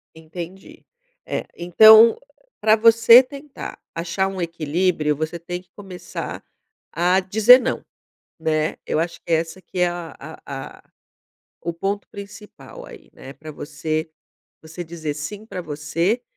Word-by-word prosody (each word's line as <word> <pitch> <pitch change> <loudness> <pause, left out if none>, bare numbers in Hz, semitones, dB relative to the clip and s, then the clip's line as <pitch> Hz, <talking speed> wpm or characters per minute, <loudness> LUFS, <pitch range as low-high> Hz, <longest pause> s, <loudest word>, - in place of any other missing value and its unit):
Entendi, 170 +3 -10 0.4
eh, - - -3
então, 220 - +7 0.4
pra 215 +1 +4
você 230 +2 +7
tentar 280 +2 -10 0.2
achar 170 +3 -1
um 190 -1 -6
equilíbrio, 165 -1 -1
você 155 +3 -4
tem 175 +2 -6
que - - -35
começar 185 -4 -8 0.5
a 180 +3 +2
dizer 220 +6 +6
não, - - -2 0.6
né, 155 -1 0
eu - - -1
acho 170 +1 -3
que 170 - -4
é - - +6
essa 165 +3 -5
que 180 - -9
é 180 - +4
a 175 -2 -7 0.3
a 135 -1 -8
a - - -23 0.8
o 170 - -3
ponto 195 +4 -3
principal 210 - -12
aí, - - -14
né. 135 - -11
Pra 155 +2 -11
você 155 +2 -4 0.5
você 160 +2 -8
dizer 160 -2 -5
sim 155 +9 -7
pra 185 - -6
você 165 +9 -2
175 Hz, 145 wpm, -21 LUFS, 160-205 Hz, 0.8 s, então